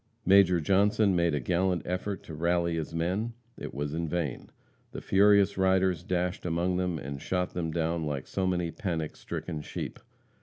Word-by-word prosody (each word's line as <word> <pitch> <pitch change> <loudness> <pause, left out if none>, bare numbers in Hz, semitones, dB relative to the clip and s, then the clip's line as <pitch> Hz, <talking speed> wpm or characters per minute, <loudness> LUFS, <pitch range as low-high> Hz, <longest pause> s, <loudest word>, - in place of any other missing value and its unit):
Major 95 -2 +6
Johnson 100 +4 +3
made 85 -6 +1
gallant 90 0 +1
effort 95 +2 -3
to 80 - -9
rally 85 +2 +1
his 80 -1 -3
men. 90 +8 -1 0.2
It - - -7
was 75 +1 -3
in 85 0 -2
vain. 80 -6 -3 0.4
The - - -4
furious 100 0 +4
riders 95 -2 +3
dashed 90 0 -2
among 90 +1 0
them 90 -2 -1
and 70 -1 -6
shot 90 -1 -1
them 85 -2 -2
down 80 0 -1
like 70 -3 -3
so 95 -1 -1
many 90 -2 0
panic 80 -6 -3
stricken 80 -4 -5
sheep. - - -6
90 Hz, 165 wpm, -29 LUFS, 80-95 Hz, 0.4 s, Major